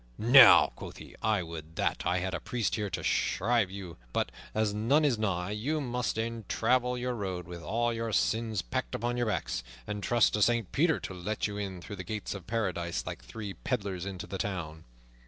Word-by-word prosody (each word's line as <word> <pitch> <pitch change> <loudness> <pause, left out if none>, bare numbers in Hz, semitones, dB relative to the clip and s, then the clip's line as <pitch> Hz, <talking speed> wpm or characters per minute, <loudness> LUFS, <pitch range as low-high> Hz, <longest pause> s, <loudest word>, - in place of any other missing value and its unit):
"Now," 125 +5 +8
quoth - - -9
he, - - -11
"I 105 -4 +2
would 80 -1 -8
that - - 0
I 90 - +2
had 95 +1 -2
a - - -1
priest 120 -5 -2
here 105 -2 -1
to - - -4
shrive 115 0 +2
you; 95 -3 -8 0.2
but, - - 0 0.2
as 110 -1 +1
none 130 +9 +3
is 125 -6 +2
nigh, 95 -3 -1
you 130 +9 -1
must 125 -4 -2
e'en 115 0 -2
travel 125 +2 +2
your 125 0 -2
road 95 -6 -4
with 85 0 -8
all 120 +6 0
your 115 0 -2
sins 110 -1 +1
packed - - -3
upon 120 +2 -1
your 120 -1 0
backs, 95 - -1 0.2
and 105 0 -4
trust 120 +2 +3
to 105 - +1
Saint 115 -2 +2
Peter 160 +2 +3
to - - -5
let 95 +4 -2
you 105 -1 -3
in 95 -3 -4
through 105 - -7
the 95 - -5
gates 110 +1 -4
of 95 -4 -9
Paradise 90 -7 -1
like - - -6
three 100 - -6
peddlers 100 -2 -3
into 95 -2 -5
the 95 - -6
town." 80 -5 -4
105 Hz, 210 wpm, -30 LUFS, 90-115 Hz, 0.2 s, Now